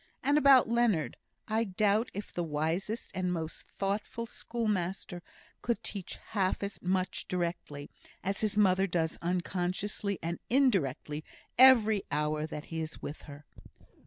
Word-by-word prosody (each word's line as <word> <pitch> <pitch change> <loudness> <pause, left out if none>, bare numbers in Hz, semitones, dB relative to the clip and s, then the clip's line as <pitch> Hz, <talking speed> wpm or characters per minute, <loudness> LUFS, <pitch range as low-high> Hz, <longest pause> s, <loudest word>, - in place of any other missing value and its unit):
And 285 - +3
about 275 -4 +7
Leonard; 230 -8 +2 0.3
I 220 +1 +1
doubt 210 +3 +2
if 205 - -6
the 175 - -1
wisest 165 +8 -2
and 185 -1 -1
most 165 -2 -4
thoughtful 205 +4 -3
schoolmaster 200 -6 -2 0.4
could 235 -1 -1
teach 195 -4 -5
half 195 -2 0
as 200 0 -5
much 185 0 -1
directly, 170 -5 -3 0.3
as 195 +1 -1
his 215 -1 0
mother 190 -2 +4
does 165 -2 -1
unconsciously 185 +3 -1
and 170 +1 -2
indirectly 165 - +1 0.3
every 225 -5 +7
hour 150 +1 0
that 150 -1 -6
he 160 - -1
is 160 0 -5
with 145 - -6
her. 145 +1 -11
190 Hz, 135 wpm, -31 LUFS, 165-215 Hz, 0.4 s, about